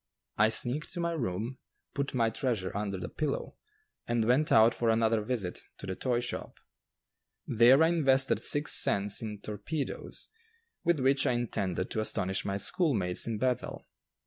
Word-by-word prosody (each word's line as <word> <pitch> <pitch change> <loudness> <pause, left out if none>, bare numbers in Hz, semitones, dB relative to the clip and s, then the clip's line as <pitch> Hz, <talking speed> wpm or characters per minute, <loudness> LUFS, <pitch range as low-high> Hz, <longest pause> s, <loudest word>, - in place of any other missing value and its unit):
I 110 +1 +5
sneaked 125 +7 +1
to 175 - -5
my 170 0 -1
room, 120 - -3 0.3
put 140 -1 -3
my 115 -2 +2
treasure 110 -7 -2
under 100 -2 -2
the 90 - -5
pillow, 150 -3 -4 0.5
and 120 -2 0
went 130 +6 +2
out 110 +1 +6
for 115 - 0
another 110 0 +2
visit 105 -5 -3 0.2
to - - -9
the 95 -1 -4
toy 120 +1 -1
shop. 120 - -5 0.9
There 125 +6 +5
I 160 - +4
invested 135 -5 +2
six 145 +1 +2
cents 100 +1 +3
in 105 -3 -6
"torpedoes," 110 +8 -5 0.5
with 170 -3 +2
which 135 +1 +2
I - - +2
intended 100 -6 -2
to - - -2
astonish 95 -3 -1
my 100 0 -2
schoolmates 100 - +1
in 115 -2 -2
Bethel. 125 +1 -2
120 Hz, 160 wpm, -30 LUFS, 105-135 Hz, 0.9 s, out